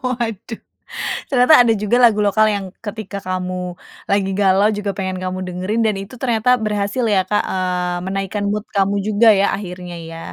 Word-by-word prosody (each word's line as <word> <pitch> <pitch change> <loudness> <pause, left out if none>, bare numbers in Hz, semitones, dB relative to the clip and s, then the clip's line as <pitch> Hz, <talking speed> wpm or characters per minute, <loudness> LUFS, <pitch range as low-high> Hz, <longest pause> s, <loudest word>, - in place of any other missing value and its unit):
Waduh, 230 -3 -4 0.7
ternyata 255 +3 +5
ada 230 - +3
juga 210 +3 +2
lagu 225 -3 +5
lokal 215 +2 +3
yang 200 -1 -3 0.2
ketika 205 -2 -6
kamu 185 0 -3 0.6
lagi 200 -1 +1
galau, 195 +1 +4
juga 205 -1 -2
pengen 190 -1 -3
kamu 185 0 -3
dengerin, 185 +5 -2
dan 215 - +1
itu 195 +6 -11
ternyata 235 -2 +1
berhasil 210 +3 -1
ya, 190 - +4
Kak, 210 - +1
eee, 180 -1 -1
menaikkan 195 +1 -3
mood 210 0 -2
kamu 200 0 +2
juga 215 +2 +4
ya, 200 - +3
akhirnya 180 -2 -7 0.2
ya. 165 - -8
200 Hz, 170 wpm, -19 LUFS, 185-215 Hz, 0.7 s, ternyata